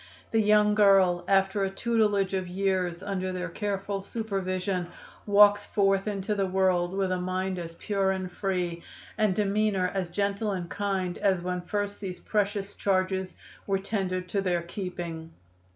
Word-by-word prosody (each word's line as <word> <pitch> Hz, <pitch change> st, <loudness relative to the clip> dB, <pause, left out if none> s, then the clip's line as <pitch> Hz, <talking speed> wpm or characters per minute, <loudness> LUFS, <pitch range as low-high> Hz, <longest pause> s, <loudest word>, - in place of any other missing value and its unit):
The 225 Hz, -, +3 dB
young 210 Hz, 0 st, +4 dB
girl, 195 Hz, -4 st, +5 dB
after 195 Hz, +1 st, +2 dB
a 195 Hz, -, +1 dB
tutelage 205 Hz, -2 st, +1 dB
of 185 Hz, -1 st, -1 dB
years 185 Hz, -1 st, -1 dB
under 190 Hz, -2 st, -2 dB
their 180 Hz, -1 st, -3 dB
careful 200 Hz, +1 st, -3 dB
supervision, 190 Hz, -4 st, -2 dB, 0.4 s
walks 205 Hz, 0 st, +6 dB
forth 195 Hz, 0 st, +2 dB
into 205 Hz, 0 st, -1 dB
the 195 Hz, -2 st, 0 dB
world, 185 Hz, -1 st, +1 dB
with 195 Hz, -1 st, 0 dB
a 185 Hz, -, 0 dB
mind 185 Hz, 0 st, -2 dB
as 165 Hz, -1 st, -7 dB
pure 195 Hz, +1 st, 0 dB
and 190 Hz, -1 st, -2 dB
free, 180 Hz, -3 st, -2 dB, 0.3 s
and 215 Hz, -4 st, +2 dB
demeanor 200 Hz, -2 st, +1 dB
as 190 Hz, -3 st, -2 dB
gentle 200 Hz, +3 st, -1 dB
and 180 Hz, -2 st, -4 dB
kind, 190 Hz, -3 st, -2 dB
as 190 Hz, -4 st, +2 dB
when 180 Hz, 0 st, -2 dB
first 205 Hz, +2 st, -3 dB
these 185 Hz, -3 st, -6 dB
precious 205 Hz, -1 st, -1 dB
charges 190 Hz, -1 st, 0 dB, 0.3 s
were 195 Hz, -1 st, +2 dB
tendered 190 Hz, -2 st, -2 dB
to 200 Hz, +2 st, 0 dB
their 175 Hz, -3 st, 0 dB
keeping. 170 Hz, -3 st, -6 dB
195 Hz, 155 wpm, -28 LUFS, 185-205 Hz, 0.4 s, walks